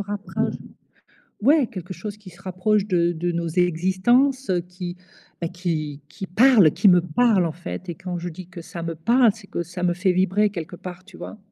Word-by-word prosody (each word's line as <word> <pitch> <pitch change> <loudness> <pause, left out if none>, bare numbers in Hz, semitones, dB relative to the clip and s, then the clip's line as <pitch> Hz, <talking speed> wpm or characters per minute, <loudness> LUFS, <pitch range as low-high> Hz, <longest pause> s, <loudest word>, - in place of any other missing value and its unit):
rapproche 205 0 -3 0.9
ouais, 285 +1 +5
quelque 185 -5 -7
chose 210 -1 -7
qui 195 -3 -13
se 175 +3 -18
rapproche 195 +3 0
de 175 -3 +2
de 175 +1 -2
nos 170 0 -2
existences, 190 - +2
heu, 180 -1 +2
qui, 180 0 -7 0.4
ben, 170 - -2
qui 155 -5 -3
qui 190 +4 -7
parle, 210 - +5
qui 205 - +4
me 180 -1 +6
parle, 190 +2 +3
en 160 - -2
fait 180 +2 -7
et - - -4
quand 180 -1 -5
je 175 +1 -5
dis 175 +2 -10
que 175 -2 -9
ça 170 0 -8
me 165 0 -3
parle, 235 +7 +4
c'est 220 -3 -14
que 170 - -3
ça 180 +1 -7
me 175 - +3
fait 185 +1 +2
vibrer 190 +3 +2
quelque 175 -2 -6
part, 180 +1 -9
tu 200 -3 -15
vois? 215 - -8
185 Hz, 210 wpm, -23 LUFS, 175-205 Hz, 0.9 s, me